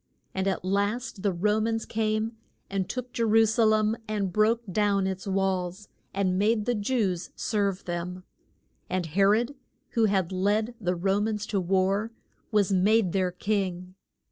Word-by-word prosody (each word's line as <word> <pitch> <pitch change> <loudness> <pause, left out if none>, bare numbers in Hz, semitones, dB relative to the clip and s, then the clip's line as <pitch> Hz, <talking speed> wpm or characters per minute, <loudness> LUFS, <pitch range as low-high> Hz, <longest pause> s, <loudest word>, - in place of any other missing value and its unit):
And 190 0 -1
at 190 -2 -1
last 205 +3 -1
the 200 - +1
Ro 210 +5 +1
mans 225 0 -1
came 215 0 0 0.4
and 195 -2 -1
took 250 -1 -5
Je - - -2
ru 225 0 +5
sa 220 +1 +2
lem 215 0 +3
and 200 -4 -2
broke 225 +3 +3
down 200 0 +2
its 190 +1 -3
walls, 190 0 -1 0.2
and 185 -1 0
made 215 +1 +2
the 245 - +1
Jews 205 -5 -1
serve 200 -3 -1
them. 180 +1 -4 0.7
And 185 -1 -1
He 165 +5 -1
rod, 225 +7 +3 0.4
who 230 -1 +2
had 195 -4 +1
led 205 +5 +1
the 180 -2 0
Ro 195 +3 +1
mans 210 -1 -1
to 210 -3 -1
war, 195 +4 +1 0.4
was 205 -3 +2
made 200 +1 +3
their 185 -2 +2
king. 185 -2 -2
200 Hz, 165 wpm, -27 LUFS, 185-215 Hz, 0.7 s, ru